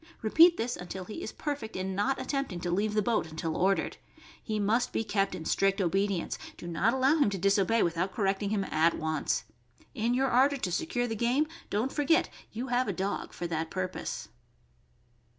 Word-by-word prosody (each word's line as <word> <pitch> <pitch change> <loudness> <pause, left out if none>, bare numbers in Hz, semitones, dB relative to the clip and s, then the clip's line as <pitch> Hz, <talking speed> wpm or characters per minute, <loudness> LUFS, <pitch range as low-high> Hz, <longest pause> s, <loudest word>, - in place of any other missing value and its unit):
Repeat 330 +10 +6
this 240 +2 -1
until 180 +1 -7
he 220 - -7
is - - -5
perfect 285 -7 -4
in 190 +1 -2
not 230 +8 0
attempting 275 -11 -2
to 175 0 -2
leave 210 +4 0
the 210 - +3
boat 220 -7 0
until 160 0 -3
ordered. 195 +2 +1 0.4
He 215 -2 -3
must 230 +5 +1
be - - -1
kept 195 -3 0
in 165 -3 -7
strict 195 +3 +2
obedience; 195 0 0 0.2
do - - -9
not 200 +8 +1
allow 265 +4 +4
him 285 -9 +4
to 200 - -3
disobey 200 +4 +3
without 175 +3 0
correcting 200 -1 0
him 205 -2 0
at 165 -2 +2
once. 160 -1 -1 0.5
In 235 -1 0
your 265 +1 +2
ardor 275 +3 +4
to 195 -8 -2
secure 245 - -1
the 225 -2 -3
game, 245 +7 +2 0.2
don't 225 +6 -1
forget 325 +4 +3
that - - -13 0.2
you 240 +4 -5
have 250 +1 +1
a 200 - -1
dog 190 +3 -3
for 175 - -6
that 160 -1 -2
purpose. 185 -1 -4
205 Hz, 195 wpm, -29 LUFS, 185-245 Hz, 0.5 s, Repeat